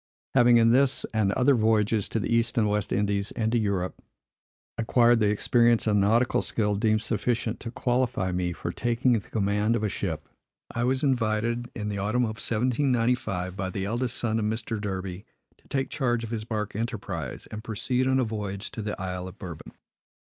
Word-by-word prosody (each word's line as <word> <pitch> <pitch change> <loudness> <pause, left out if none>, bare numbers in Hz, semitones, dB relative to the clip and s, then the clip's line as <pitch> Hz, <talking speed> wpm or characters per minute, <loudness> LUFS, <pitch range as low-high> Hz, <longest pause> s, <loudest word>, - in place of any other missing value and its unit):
Having 120 -2 +6
in 115 0 +5
this, 135 +1 +3
and 105 -3 +2
other 130 +5 +4
voyages 110 -2 +2
to 115 - -1
the 115 - -1
East 115 +2 +1
and 110 -2 +3
West 105 -1 -1
Indies 100 0 0
and 110 -2 -1
to 120 - +2
Europe, 100 -4 -2 0.7
acquired 120 +1 +4
the 105 -2 +3
experience 115 +2 +3
and 105 -2 +3
nautical 115 +5 +3
skill 105 -2 0
deemed 110 +1 +1
sufficient 115 +1 -1
to 115 - -6
qualify 120 -6 0
me 90 0 -1
for 85 0 -4
taking 120 +5 +1
the 115 - +2
command 105 +1 +1
of 110 - -1
a 105 - +1
ship, 80 -6 -4 0.4
I 120 +1 -1
was 130 +2 +1
invited, 120 -2 0
in 105 -2 -3
the 100 -1 -3
autumn 110 +5 +1
of 110 -1 -3
1795, 115 -6 0
by 95 -1 -3
the 95 +1 -3
eldest 120 +4 -1
son 115 -1 0
of 105 - -1
Mr. 110 0 -2
Derby, 95 -2 -4 0.4
to - - -26
take 135 -1 -2
charge 120 -5 0
of 115 - -6
his 110 -2 -3
bark 105 -3 -3
Enterprise, 100 - -4
and 110 0 -6
proceed 125 +3 -1
on 130 0 +3
a - - +3
voyage 105 -3 -4
to 110 - -5
the 105 -1 -4
Isle 90 -1 -4
of 95 +2 -11
Bourbon. 85 -6 -8
110 Hz, 190 wpm, -27 LUFS, 100-120 Hz, 0.7 s, Having